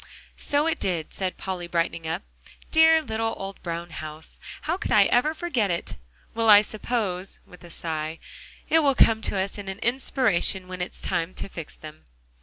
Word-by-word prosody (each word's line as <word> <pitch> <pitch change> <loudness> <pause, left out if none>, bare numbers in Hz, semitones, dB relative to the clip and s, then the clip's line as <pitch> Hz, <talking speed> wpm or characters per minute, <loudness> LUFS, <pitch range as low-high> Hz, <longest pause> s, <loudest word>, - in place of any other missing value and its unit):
"So 290 +1 +2
it 325 - 0
did," 170 -4 -2
said 185 -1 -3
Polly, 185 -2 -4
brightening 170 -1 -1
up. 160 - -2 0.5
"Dear 320 0 +6
little 225 -3 -2
old 195 0 -7
brown 170 0 -5
house, 155 0 -8 0.2
how 325 - 0
could 385 - -4
I - - +7
ever 300 +6 +2
forget 265 - 0
it! 170 -1 -3 0.4
Well, 225 -1 +2
I 205 0 +9
suppose," 205 -4 -2
with 180 - -16
a 175 - -11
sigh, 160 -1 -4 0.5
"it 325 - +5
will 280 -3 +3
come 220 -2 +5
to 200 - -2
us 195 +2 -2
as 200 - -7
an 190 0 -4
inspiration 225 -6 +1
when 185 0 -6
it's 180 - -5
time 165 +2 -1
to - - -5
fix 165 -5 -8
them." 155 0 -11
195 Hz, 185 wpm, -25 LUFS, 170-240 Hz, 0.5 s, I